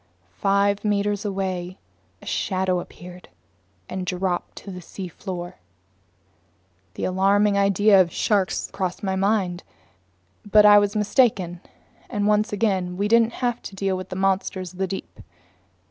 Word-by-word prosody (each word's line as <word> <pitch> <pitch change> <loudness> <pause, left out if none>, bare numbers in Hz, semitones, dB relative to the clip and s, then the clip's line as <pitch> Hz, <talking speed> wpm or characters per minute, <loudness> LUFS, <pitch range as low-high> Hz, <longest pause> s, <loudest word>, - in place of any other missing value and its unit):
Five 200 +1 +2
meters 205 0 0
away 185 -2 -3 0.5
a - - -12
shadow 185 -2 0
appeared 180 +1 -11 0.6
and 185 0 -4
dropped 180 0 -2
to 200 - -9
the 180 -1 -8
seafloor. 180 0 -7 1.4
The - - -5
alarming 200 +2 +2
idea 200 0 +5
of 170 -2 0
sharks 200 -3 0
crossed 185 -1 -3
my 190 -1 -1
mind. 190 -2 0 0.8
But 210 0 +5
I 205 0 +9
was 205 +1 0
mistaken, 205 -5 +1 0.5
and 205 -1 -1
once 210 0 +2
again 190 -4 0
we 200 +2 0
didn't 230 +1 +4
have 240 -1 -1
to 195 - -9
deal 195 0 -1
with 185 0 -7
monsters 190 -1 -1
of 185 - -15
the 190 - 0
deep. 190 - -7
195 Hz, 135 wpm, -23 LUFS, 185-205 Hz, 1.4 s, I